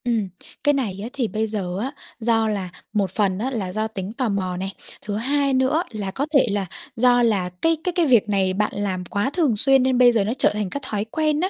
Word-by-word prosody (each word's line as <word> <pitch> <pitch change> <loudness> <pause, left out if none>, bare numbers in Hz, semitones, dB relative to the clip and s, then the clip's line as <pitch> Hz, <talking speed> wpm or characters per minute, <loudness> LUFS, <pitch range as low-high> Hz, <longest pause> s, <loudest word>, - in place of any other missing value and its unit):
Ừm. 230 -4 0 0.4
Cái 290 - +4
này 220 -9 -2
á 230 - -5
thì 260 -5 -1
bây 220 +1 -1
giờ 190 -4 -3
á 260 +6 -2 0.3
do 225 -1 +2
là 200 -4 -2 0.2
một 200 -4 0
phần 195 -2 +1
á 255 +5 -2
là 200 -7 -3
do 215 +3 -1
tính 200 -2 -6
tò 240 0 -1
mò 185 -3 -2
này, 190 +1 -4 0.3
thứ 205 -1 -3
hai 275 +5 +1
nữa 260 +6 +2
là 205 -4 -4
có 270 +8 -2
thể 275 - +5
là 200 -1 -1 0.3
do 245 +1 +4
là 200 -6 +1
cái 325 0 +3
cái 360 - +1
cái 345 -2 +3
việc 240 -7 +4
này 190 -2 +1
bạn 210 +2 0
làm 190 -3 -2
quá 200 +6 -1
thường 295 -10 +2
xuyên 270 +4 +4
nên 260 -1 +2
bây 245 -1 +7
giờ 225 -4 +2
nó 215 +4 -1
trở - - +4
thành 210 -2 -2
cái 285 - -4
thói 210 -5 -2
quen 305 +5 0
á, 370 - +1
220 Hz, 250 wpm, -22 LUFS, 200-260 Hz, 0.4 s, bây